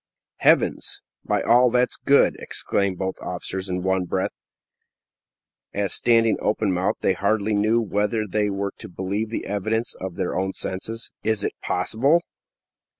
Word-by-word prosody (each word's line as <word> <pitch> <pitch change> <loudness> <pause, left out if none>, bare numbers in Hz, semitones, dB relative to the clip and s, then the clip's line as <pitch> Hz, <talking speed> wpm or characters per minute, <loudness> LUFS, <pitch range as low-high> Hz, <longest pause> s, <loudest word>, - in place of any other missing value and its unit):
"Heavens!" - - +2 0.2
"By - - 0
all 125 +1 +5
that's 125 +1 +2
good!" 140 - +4
exclaimed 100 -2 -1
both 95 0 -3
officers 95 +2 -4
in 90 0 -2
one 95 -1 +1
breath, 95 +1 -1 1.4
as, 100 -1 0
standing 115 -2 +3
open 105 -1 +1
mouthed, 90 +2 0
they 95 - +3
hardly 105 +2 +1
knew 110 +3 +3
whether 105 +1 0
they 105 +1 0
were 100 0 -2
to 110 - -9
believe 100 +4 -3
the 115 - -4
evidence 110 +3 -1
of 95 -2 -6
their 95 -2 -2
own 95 +1 -1
senses. 115 +5 -5
"Is 110 -2 0
it - - -1
possible?" 140 +10 +2
105 Hz, 150 wpm, -24 LUFS, 95-110 Hz, 1.4 s, all